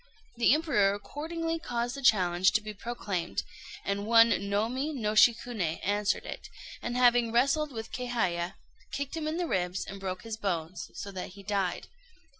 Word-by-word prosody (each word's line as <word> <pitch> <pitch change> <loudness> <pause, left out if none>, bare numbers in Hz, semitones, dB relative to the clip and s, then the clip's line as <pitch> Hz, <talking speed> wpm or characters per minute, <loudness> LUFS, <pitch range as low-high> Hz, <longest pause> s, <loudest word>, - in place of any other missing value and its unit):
The 235 0 +4
Emperor 240 -12 +2
accordingly 330 +8 -4
caused 240 -4 -2
the 275 - -6
challenge 185 -6 +4
to 215 - +3
be 215 0 -6
proclaimed; 200 -5 -3 0.4
and 200 +1 -1
one 230 0 +7 0.2
Nomi 250 +9 0
no 215 -5 -1
Shikuné 220 -6 +3
answered 205 0 +1
it, - - -7 0.3
and 240 +1 -3
having 245 -2 +4
wrestled 275 +5 +2
with 225 -2 -6
Kéhaya, 195 -9 -1 0.4
kicked 280 +2 -3
him 315 -1 -3
in 315 +2 -1
the 355 - 0
ribs 180 - -1
and 195 - -8
broke 185 -1 -4
his 225 -1 -5
bones, 180 -4 -3
so 200 - -6
that 185 -1 -6
he 200 +1 -12
died. 195 -3 -1
220 Hz, 165 wpm, -29 LUFS, 195-250 Hz, 0.4 s, one